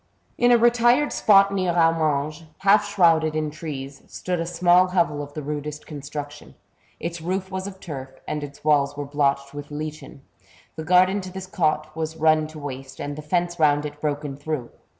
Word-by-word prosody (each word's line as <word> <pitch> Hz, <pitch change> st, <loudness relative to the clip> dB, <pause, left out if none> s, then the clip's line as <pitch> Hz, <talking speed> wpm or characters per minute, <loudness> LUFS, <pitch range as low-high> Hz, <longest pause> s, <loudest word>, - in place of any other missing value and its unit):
In 245 Hz, 0 st, +3 dB
a 240 Hz, -, +7 dB
retired 240 Hz, +4 st, +3 dB
spot 200 Hz, -1 st, +5 dB
near 185 Hz, -3 st, 0 dB
Amanges, 160 Hz, -2 st, +1 dB, 0.2 s
half 205 Hz, +1 st, +4 dB
shrouded 165 Hz, -6 st, +3 dB
in 155 Hz, -1 st, -1 dB
trees, 140 Hz, -3 st, -7 dB
stood 180 Hz, -1 st, -3 dB
a 165 Hz, -, -2 dB
small 175 Hz, +1 st, +4 dB
hovel 170 Hz, -5 st, +1 dB
of 145 Hz, 0 st, -9 dB
the 155 Hz, -, -5 dB
rudest 150 Hz, +1 st, -5 dB
construction; 145 Hz, 0 st, -8 dB, 0.4 s
its 170 Hz, 0 st, -5 dB
roof 190 Hz, +3 st, -3 dB
was 190 Hz, +1 st, -4 dB
of 190 Hz, -1 st, -9 dB
turf, 135 Hz, -8 st, -7 dB, 0.2 s
and 150 Hz, -1 st, -3 dB
its 145 Hz, 0 st, -10 dB
walls 145 Hz, -2 st, +2 dB
were 145 Hz, -, -3 dB
blotched 140 Hz, -1 st, 0 dB
with 145 Hz, 0 st, -8 dB
lichen. 150 Hz, -2 st, -7 dB, 0.5 s
The 160 Hz, -, -6 dB
garden 185 Hz, +3 st, +4 dB
to 185 Hz, 0 st, -8 dB
this 190 Hz, 0 st, -7 dB
cot 155 Hz, -4 st, -1 dB
was 160 Hz, 0 st, -4 dB
run 155 Hz, -1 st, +3 dB
to 155 Hz, 0 st, -12 dB
waste, 135 Hz, -2 st, -7 dB
and 145 Hz, 0 st, -4 dB
the 150 Hz, -, -7 dB
fence 175 Hz, +3 st, -1 dB
round 145 Hz, -1 st, +3 dB
it 150 Hz, 0 st, -8 dB
broken 145 Hz, -2 st, -2 dB
through. 145 Hz, -4 st, -4 dB
155 Hz, 185 wpm, -23 LUFS, 145-180 Hz, 0.5 s, a